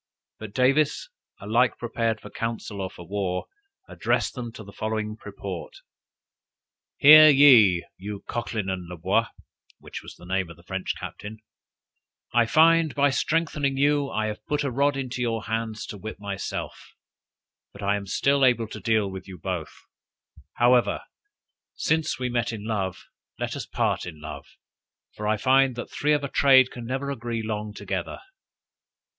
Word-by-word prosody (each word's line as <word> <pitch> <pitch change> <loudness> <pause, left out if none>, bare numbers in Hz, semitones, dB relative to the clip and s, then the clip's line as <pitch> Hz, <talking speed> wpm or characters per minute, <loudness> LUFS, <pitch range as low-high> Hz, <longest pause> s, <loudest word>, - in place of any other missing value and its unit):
But 110 -2 -9
Davis, 140 - +2 0.3
alike 115 +5 +1
prepared 115 -1 -1
for - - -12
council 115 -3 -4
or 95 - -3
for 85 - -12
war, 95 -2 -2 0.4
addressed - - -1
them 120 -3 -6
to 110 - -9
the 100 0 -13
following 110 0 -3
purport: 100 -4 -8 1.2
"Hear 155 +1 +10
ye, 120 - +7
you 100 +1 -7
Cochlyn 110 -4 -3
and 95 -2 -3
La 90 - -7
Boise, 80 - +1 0.5
(which - - -9
was - - -11
the - - -15
name 95 -1 -1
of 85 - -12
the 85 - -19
French 95 +1 -3
captain) 105 +1 -8 1.0
I 120 -1 +4
find, 165 +2 +4
by 140 -1 +3
strengthening 145 -2 0
you, 145 0 +2
I 110 0 -1
have 105 0 -5
put 150 0 0
a 140 - -1
rod 140 +2 +1
into 130 -2 -4
your 115 -2 -1
hands 110 -1 -3
to 105 - -8
whip 110 +2 -7
myself; 100 -1 -6 0.8
but 100 - -11
I 100 +1 +2
am 100 -1 -5
still 140 +7 +2
able 120 -3 +3
to 110 - -7
deal 110 0 +1
with 95 0 -8
you 95 -1 -9
both: 90 -2 -6 0.7
however, 120 0 +3 0.7
since 160 -1 0
we 125 -1 -2
met 120 -1 -1
in 105 -2 -7
love, 95 -5 -3 0.3
let - - -3
us - - -6
part - - -1
in 80 -3 -9
love; 75 0 -8 0.7
for 105 - -5
I 110 0 +2
find 130 +2 +3
that 120 - -7
three 150 +1 +1
of 145 -1 +1
a - - -1
trade 130 -2 +5
can 120 -1 -8
never 135 +2 -2
agree 120 -3 -4
long 105 -1 -3
together." 100 -2 -4
115 Hz, 165 wpm, -25 LUFS, 100-135 Hz, 1.2 s, Hear